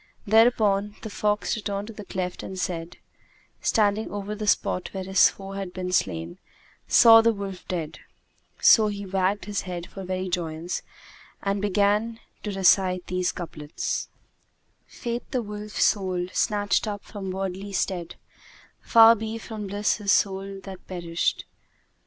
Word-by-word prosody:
Thereupon 210 -2 +3
the 220 - -6
fox 210 +2 0
returned 205 -2 -3
to - - -8
that 210 -2 -11
cleft 180 -1 -3
and, 190 - -7 1.0
standing 215 -1 +1
over 205 0 -4
the 210 0 -5
spot 180 -2 +1
where 190 - -3
his 190 +1 +5
foe 195 0 -10
had 195 -2 -5
been 180 -1 -4
slain, 85 - -1 0.5
saw 225 -1 +8
the 230 0 +4
wolf 200 -3 -7
dead: 160 -3 -4 0.6
so 220 -2 +6
he 205 -1 -4
wagged 195 +1 0
his 205 -1 -2
head 175 -2 -6
for 195 - -9
very 185 0 -3
joyance 170 -1 -3 0.6
and 200 0 0
began 205 +3 +1 0.2
to 210 - -4
recite 185 -1 +3
these 180 0 -1
couplets, 150 -4 -4 0.8
"Fate 235 0 -5
the 255 -3 -1
Wolf's 210 0 -3
soul 185 -3 +1
snatched 205 +1 +1
up 205 -1 -4
from 195 -3 -7
wordly 190 +1 -4
stead; 175 -3 -2 0.4
* - - -26
Far 225 -1 +7
be 220 0 -4
from 220 -2 -7
bliss 205 +2 0
his 205 -3 0
soul 195 0 +1
that 190 -2 -10
perished! 170 -2 -2
195 Hz, 145 wpm, -25 LUFS, 185-210 Hz, 1.0 s, saw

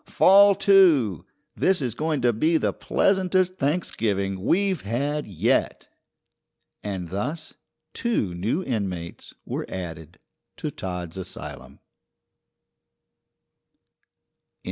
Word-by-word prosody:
Fall 200 +1 +6
to! 160 - +4 0.3
This 190 -1 +2
is 125 -5 -2
going 150 0 -2
to 120 -1 +3
be 160 +9 +2
the - - 0
pleasantest 185 -1 +1
Thanksgiving 105 - -1
we've 190 - +1
had 140 +8 -2
yet." 95 -6 0 0.9
And 95 -4 -4
thus 145 - -4 0.4
two 220 - -1
new 110 - -1
inmates 95 - -5
were - - -4
added 80 -3 -7 0.4
to - - -4
Todd's 90 -1 -6
asylum. 95 - -8
125 Hz, 95 wpm, -24 LUFS, -, 0.9 s, Fall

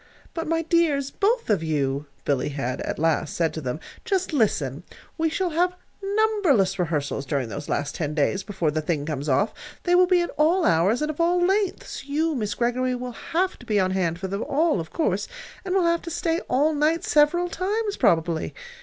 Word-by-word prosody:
"But, 330 -1 -4
my 330 +1 +1
dears, 310 -5 +2
both 455 +4 +1
of 200 - +2
you," 145 -3 -1 0.2
Billy 140 0 0
had 135 -3 -3
at - - -3
last 155 -1 0
said 165 -2 +1
to 160 - -5
them; 130 +2 -3 0.2
"just 380 -6 -1
listen. 150 - +1 0.3
We 325 0 +1
shall 355 +2 -1
have 355 +3 +1 0.3
numberless 395 - +2
rehearsals 150 -5 -1
during 140 -4 -2
those 145 +6 -6
last 145 0 -1
ten 150 -2 -3
days 155 +6 +1
before 185 -6 -1
the 155 +1 -1
thing 150 -2 -1
comes 150 -1 -3
off. 140 +11 +2 0.3
They 350 - +1
will 360 0 +6
be 360 -1 +4
at 345 - -2
all 335 +4 +4
hours, 195 - +3
and 305 - 0
of 310 - -4
all 350 +1 +3
lengths. 390 -5 -1
You, 310 +3 0
Miss 210 -6 -2
Greggory, 250 +1 0
will 250 0 -5
have 355 +10 -2
to 245 - -13
be 210 -2 +2
on 185 -1 +1
hand 175 -3 0
for 190 +2 -4
them 200 +3 -3
all, 310 - +2
of 160 -1 -5
course, 325 - 0 0.4
and 375 -1 -2
will 375 -3 +3
have 335 0 +2
to 335 - -7
stay 330 0 0
all 295 +4 +3
night 305 +3 +1
several 310 +4 +3
times, 410 +4 -2
probably. 165 -1 +1
255 Hz, 205 wpm, -24 LUFS, -, 0.4 s, will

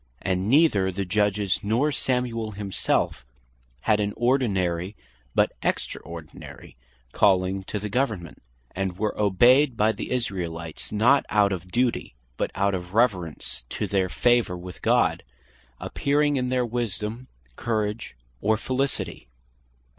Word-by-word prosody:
And 95 +1 0
neither 120 - +4
the 95 +1 -3
Judges, 100 +1 +1
nor 120 +9 +1
Samuel 120 -5 -1
himselfe 100 -9 -1 0.6
had 105 -1 +2
an 105 0 -1
ordinary, 100 -7 +1 0.4
but - - +3
extraordinary 85 -2 -5 0.4
calling 95 +3 +2
to 105 - -3
the 105 +1 -4
Government; 105 - -2 0.3
and 95 -1 -3
were 105 0 -1
obeyed 120 +6 +4
by 110 +1 +4
the 105 - -6
Israelites, 90 -9 -3
not 120 +7 +4
out 105 -1 +3
of 90 -1 -4
duty, 120 - 0 0.2
but - - -1
out 100 0 +1
of 90 +1 -5
reverence 85 - 0
to - - -2
their 95 -2 0
favour 120 +1 +2
with 90 0 -10
God, - - +2 0.6
appearing 145 +1 +1
in 125 -2 0
their 125 -1 +1
wisdome, 115 0 -3 0.3
courage, 110 - -2 0.3
or 110 +1 +2
felicity. 130 - -2
105 Hz, 125 wpm, -25 LUFS, 95-120 Hz, 0.6 s, neither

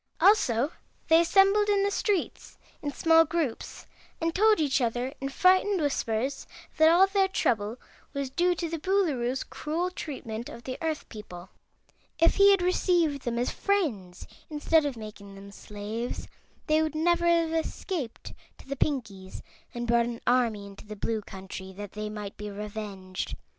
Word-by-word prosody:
Also 315 - +4 0.4
they 325 +1 +7
assembled 395 +4 +4
in 400 -1 +3
the 405 - +1
streets 400 -3 -2 0.2
in 290 - -3
small 325 +2 +5
groups 320 -7 -3 0.3
and 330 0 -1
told 430 +3 +4
each 285 -3 +2
other 245 +3 -1
in 275 - -2
frightened 370 +6 +3
whispers 270 -3 -1 0.3
that 315 0 +7
all 350 +3 +6
their 390 0 +2
trouble 225 - 0 0.3
was 280 -2 -4
due 350 +5 +2
to 340 0 -3
the 330 0 -4
Boolooroo's 290 -9 0
cruel 335 +4 -3
treatment 240 -9 -6
of 235 - -10
the 255 - -5
Earth 320 -2 -2
people. 185 -5 -10 0.7
If 330 +1 +3
he 400 0 +7
had 390 -3 +4
received 345 -5 +1
them 235 -1 -1
as 245 +1 0
friends 235 - -1 0.2
instead 305 0 +2
of 265 -4 -5
making 210 -2 -10
them 200 0 -11
slaves, 210 +4 -6 0.4
they 310 0 +3
would 315 -1 -1
never 345 +2 +2
have 335 -1 +3
escaped 325 - -4 0.2
to - - -16
the 275 - -3
Pinkies 220 -11 -3 0.3
and 240 0 -4
brought 235 0 +3
an 235 -1 -5
army 235 -5 +2
into 200 +1 -12
the 215 - -7
Blue 220 +2 -2
Country, 190 -1 -9
that 205 0 -8
they 210 0 -5
might 210 -1 -6
be 210 0 -6
revenged. 200 -2 -6
275 Hz, 165 wpm, -28 LUFS, 220-340 Hz, 0.7 s, they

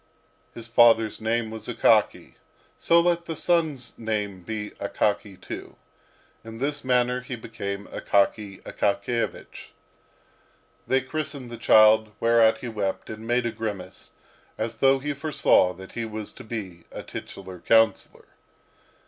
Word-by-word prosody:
His 115 -1 -7
father's 115 -2 +4
name 110 0 -1
was 110 0 -7
Akaky, - - +2 0.4
so 170 - +4
let 170 0 +1
his 165 - -4
son's 155 -8 0
name 105 -4 -3
be 105 +2 -5
Akaky 100 -1 -1
too." - - -8 0.7
In 115 0 -9
this 145 +4 -3
manner 125 0 +1
he 125 0 -6
became 100 -3 -6
Akaky 100 0 0
Akakiyevich. 115 +3 -2 1.2
They 130 0 +2
christened 140 -2 -5
the - - -5
child, 110 -1 +5
whereat 115 -1 +4
he 125 - -5
wept, 105 -4 -3
and 110 +1 -8
made 120 0 +1
a 115 - 0
grimace, 105 -5 -6 0.5
as 115 0 -3
though 135 +3 +4
he 145 +2 -3
foresaw 140 - +3
that 95 +2 -12
he 115 - -4
was 110 -1 -6
to 130 - -11
be 100 -7 -7
a - - -7
titular 90 -1 -9
councillor. 110 +2 +2
115 Hz, 135 wpm, -25 LUFS, 105-125 Hz, 1.2 s, child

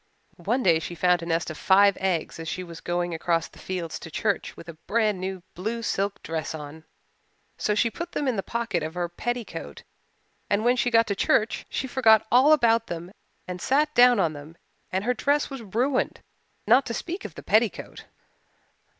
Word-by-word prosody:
One 255 +1 +1
day 165 -3 +4
she 170 +1 -6
found 180 +1 +2
a 165 - -6
nest 165 -1 -1
of 155 - -9
five 200 +1 +5
eggs 180 -4 -1
as 165 - -6
she 185 - -4
was 170 -2 -10
going 175 0 -2
across 165 0 0
the - - -18
fields 175 -4 -4
to - - -9
church 205 +5 -2
with 170 - -11
a 170 - -7
brand 210 +4 0
new 185 -1 -5
blue 225 +6 -4
silk 200 -2 -2
dress 160 0 -4
on. 155 +1 -9 0.7
So 210 - +1
she 230 +2 +2
put 340 +6 -7
them 290 - -1
in 255 - +1
the 195 - -1
pocket 235 -5 -2
of 160 +2 -5
her 175 -1 -1
petticoat 175 - -5 0.7
and 205 +2 +1
when 245 +1 +4
she 245 0 +1
got 230 -1 +4
to 200 - -2
church 215 +3 +1
she - - -2
forgot 235 -4 +4
all 260 +5 +6
about 230 -6 +4
them 175 +1 -6 0.4
and 180 -1 -6
sat 300 +3 +2
down 245 -3 +6
on 165 -4 +1
them 150 +2 -11 0.4
and 190 +1 -1
her 250 +3 +1
dress 285 +4 0
was 270 -2 -6
ruined, 245 +6 -1 0.4
not 245 +5 +4
to 230 - -3
speak 360 +3 -5
of - - -8
the - - -9
petticoat. - - 0
200 Hz, 200 wpm, -25 LUFS, 170-240 Hz, 0.7 s, all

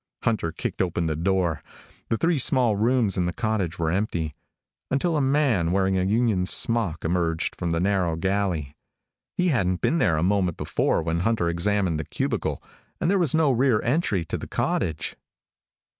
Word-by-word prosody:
Hunter 110 -8 0
kicked - - -4
open 85 -2 -1
the 80 -1 -1
door. 85 -2 0 0.5
The 115 - +1
three 165 +1 +1
small 125 -4 +3
rooms 115 -1 +1
in 90 - +1
the - - -1
cottage 110 -6 -2
were 80 -1 0
empty 85 -5 -2 0.6
until 160 +5 0
a 150 - +2
man 135 - +2
wearing 95 0 +1
a - - +1
union 105 -2 +1
smock 105 -9 +1
emerged 80 -1 0
from 85 - -3
the 85 0 0
narrow 90 -3 +1
galley. 90 -5 -1 0.6
He 180 0 +2
hadn't 95 - 0
been 165 - +1
there 80 - +2
a 75 - 0
moment 95 -3 +1
before - - 0
when 80 0 -1
Hunter 95 -3 +1
examined 90 -1 +1
the - - -2
cubicle, - - -2 0.4
and 170 - +1
there 200 - +2
was 160 -5 +2
no 160 -3 +3
rear 125 -2 +2
entry 120 - 0
to - - -4
the - - -7
cottage. 75 -1 -2
95 Hz, 175 wpm, -25 LUFS, 85-120 Hz, 0.6 s, small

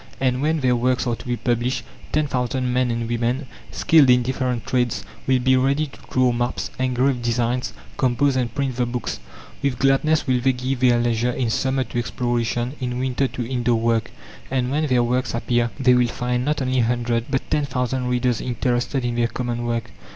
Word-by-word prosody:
And 130 -1 +1
when 155 +1 +1
their 125 -2 +3
works 125 +1 +1
are 120 -2 0
to - - -12
be 120 0 -1
published, 120 +1 -1 0.3
ten 155 0 +2
thousand 125 -1 -1
men 125 0 +2
and 115 -1 -2
women, 120 +4 -1 0.2
skilled 155 -5 +4
in 125 0 +5
different 125 -1 -2
trades, 125 -2 0 0.2
will 130 0 +4
be 130 +1 +3
ready 135 +4 +2
to 140 - -13
draw 130 -1 +3
maps, 120 +1 -2
engrave 130 0 +1
designs, 120 +1 0 0.3
compose, 130 +2 +2
and 125 -2 0
print 135 -3 -1
the 125 -1 +1
books. 120 - -3 0.4
With 140 -3 0
gladness 135 +4 +2
will 130 -3 +1
they 130 +1 +3
give 130 +1 -2
their 125 -2 +4
leisure 120 0 +1
in 120 -2 -1
summer 130 +2 +1
to 120 0 -4
exploration, 120 0 -1
in 125 -1 -2
winter 130 +1 0
to 125 -2 -5
indoor 120 -2 +1
work. 115 -1 +1 0.4
And 130 -1 0
when 155 +2 +1
their 125 -3 +3
works 125 0 0
appear, 120 0 +1
they 130 -2 +5
will 125 -1 +4
find 125 +1 -2
not 145 0 0
only 130 0 +1
a - - +4
hundred, 120 -1 0
but 135 -1 -1
ten 150 -1 +2
thousand 125 -1 -2
readers 125 -2 +1
interested 125 +1 -1
in 120 - -1
their 120 0 +1
common 120 -1 -3
work. 115 -1 -2
125 Hz, 200 wpm, -22 LUFS, 120-130 Hz, 0.4 s, in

